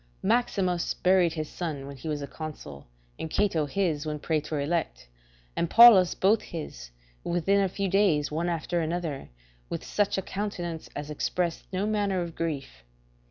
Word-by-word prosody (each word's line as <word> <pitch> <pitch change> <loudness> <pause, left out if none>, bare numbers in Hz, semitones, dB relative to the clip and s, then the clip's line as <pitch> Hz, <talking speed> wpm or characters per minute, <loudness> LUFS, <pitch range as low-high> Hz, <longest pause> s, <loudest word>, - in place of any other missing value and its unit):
Q. - - -1
Maximus 195 -7 +1
buried 180 -3 +3
his 155 -2 -3
son 150 -6 -5
when 140 0 -8
he 135 +4 -9
was 150 -2 -2
a - - -5
consul, 140 - -8 0.3
and - - -3
M. - - -13
Cato 170 -5 +1
his 160 -3 0
when 155 -1 -3
praetor 155 0 -2
elect, 145 - -2 0.5
and - - +1
L. - - -11
Paulus 225 -6 +9
both 205 +4 +3
his, - - -7 0.3
within 185 +4 +2
a 195 - +1
few 195 +2 -2
days 180 -7 +2
one 165 +3 -1
after 170 +1 -1
another, 160 -3 -3 0.4
with - - -4
such 205 -1 0
a 190 - -1
countenance 175 -5 -4
as 145 +1 -5
expressed 170 +3 -2
no 190 +2 -1
manner 205 -3 0
of 170 -1 -7
grief. 140 - -4
170 Hz, 175 wpm, -27 LUFS, 150-190 Hz, 0.5 s, Paulus